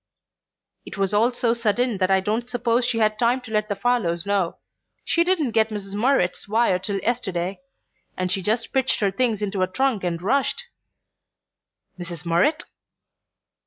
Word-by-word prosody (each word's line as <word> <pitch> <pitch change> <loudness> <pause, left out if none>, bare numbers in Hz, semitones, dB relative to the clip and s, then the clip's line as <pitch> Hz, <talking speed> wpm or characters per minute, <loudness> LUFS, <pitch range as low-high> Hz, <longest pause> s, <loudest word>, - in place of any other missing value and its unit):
"It - - -9
was 195 0 0
all 225 +4 +3
so 240 -1 +1
sudden 235 -1 0
that 185 -1 +2
I 190 0 +4
don't 220 +5 -2
suppose 240 0 +1
she 235 - -1
had 215 -1 +1
time 245 +2 +2
to 240 -3 -11
let 215 0 0
the 205 - -1
Farlows 200 -6 0
know. 200 -4 0 0.5
She 335 - +3
didn't 340 -8 +1
get 220 0 +2
Mrs. 200 -2 -6
Murrett's 210 -5 +1
wire 215 -3 +2
till 195 +2 -2
yesterday, 195 -6 -2 0.6
and 185 -1 0
she 190 - 0
just 220 +5 -1
pitched 265 -1 +1
her 200 -2 +2
things 220 0 0
into 195 -2 -2
a 185 - +2
trunk 245 +1 0
and 170 -2 -1
rushed 275 - 0 0.7
" - - -37
"Mrs. 175 -1 -7
Murrett?" 225 - +2
215 Hz, 170 wpm, -23 LUFS, 190-245 Hz, 0.7 s, I